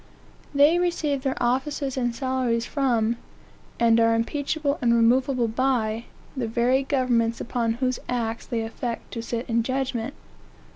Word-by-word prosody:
They 295 +5 +5
receive 320 -6 0
their 265 -1 -1
offices 270 +2 0
and 240 -2 -1
salaries 255 -3 0
from, 235 -5 +1 0.6
and 230 -1 +5
are 230 0 +4
impeachable 285 +5 -1
and 235 -2 +3
removable 245 +1 +3
by, 230 -2 0 0.3
the 255 -4 -2
very 240 +4 +2
governments 250 -4 +1
upon 235 -1 -1
whose 255 +1 -1
acts 230 -2 -2
they 235 -2 -1
affect 230 +1 -5
to 230 - -3
sit 235 +1 -4
in 230 0 +2
judgment. 260 0 -2
245 Hz, 140 wpm, -25 LUFS, 230-270 Hz, 0.6 s, They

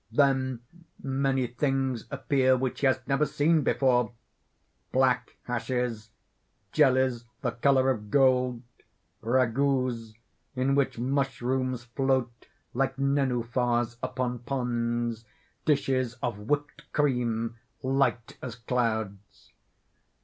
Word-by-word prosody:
Then 130 -4 +2 0.4
many 135 -1 +1
things 130 0 -1
appear 135 -2 +2
which 130 0 -2
he 140 - +3
has 130 0 +2
never 140 +2 +1
seen 155 +2 +2
before 125 -2 +2 0.8
black 125 -1 +2
hashes, 120 -2 -2 0.6
jellies, 130 -2 +3 0.2
the 125 - 0
color 130 +2 +3
of 105 -4 -5
gold, 125 -1 +3 0.6
ragouts 125 -1 +1 0.4
in 130 +2 +1
which 140 -3 +1
mushrooms 130 -1 -1
float 125 -1 -1 0.3
like 135 +1 0
nenuphars 125 -3 0
upon 125 -1 -2
ponds, 120 -2 -2 0.4
dishes 130 -5 +1
of 115 -4 -4
whipt 145 +1 -1
cream 120 -5 0 0.2
light 130 -3 0
as 125 -4 -6
clouds. 110 -4 -3
125 Hz, 100 wpm, -28 LUFS, 120-135 Hz, 0.8 s, he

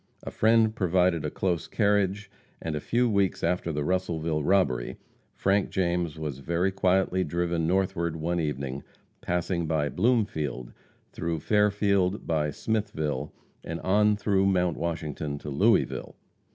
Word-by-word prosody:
A - - -6
friend 110 0 +3
provided 90 -3 +2
a - - -1
close 85 -4 -1
carriage, 100 -1 +1 0.3
and 80 -2 -4
a - - -1
few 120 +10 +1
weeks 100 -4 +1
after 90 -2 0
the 75 -1 -2
Russellville 80 -3 -1
robbery 75 -9 +1 0.4
Frank 100 +1 +1
James 85 -3 -1
was 75 -4 -4
very 85 +6 0
quietly 95 -1 +2
driven 85 0 -1
northward 85 -3 0
one 85 +2 -1
evening, 70 -3 -3 0.4
passing 85 -1 -1
by 75 -2 0
Bloomfield, 80 - 0 0.4
through 85 -1 -3
Fairfield, 100 0 +2
by 75 -2 0
Smithville, 80 -9 -2 0.3
and 85 0 -5
on 105 +2 +3
through 100 -2 +1
Mount 90 -3 +2
Washington 75 -3 -3
to 75 - -7
Louisville. 70 - +1
90 Hz, 135 wpm, -27 LUFS, 80-100 Hz, 0.4 s, friend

